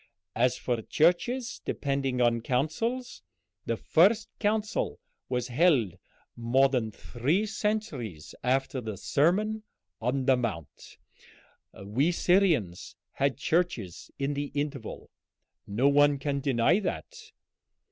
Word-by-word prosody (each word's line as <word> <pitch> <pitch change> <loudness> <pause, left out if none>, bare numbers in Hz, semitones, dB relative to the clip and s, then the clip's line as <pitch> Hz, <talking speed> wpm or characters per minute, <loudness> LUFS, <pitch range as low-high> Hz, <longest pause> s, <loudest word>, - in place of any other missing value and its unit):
As 125 +2 +2
for 120 -3 -2
churches 235 - +1
depending 135 -3 -1
on 120 -1 +3
councils, 225 - -2 0.5
the - - 0
first 210 +7 +3
council 215 +1 -1 0.3
was 125 -1 -2
held 125 - +3 0.4
more 125 +4 +3
than 125 -5 0
three 135 - -1
centuries 210 - -3
after 135 +1 0
the 110 -3 -5
Sermon 205 - +1 0.4
on 130 +3 0
the 135 -1 +5
Mount. 105 -11 -5 0.9
We 130 - +1
Syrians 170 - +1 0.2
had 140 -2 0
churches 145 - -1
in 140 +1 -1
the 145 0 -2
interval; 145 -5 -4 0.6
no 115 +7 +2
one 145 0 +5
can 140 0 -2
deny 140 - +2
that. 440 - -6
140 Hz, 110 wpm, -28 LUFS, 120-180 Hz, 0.9 s, the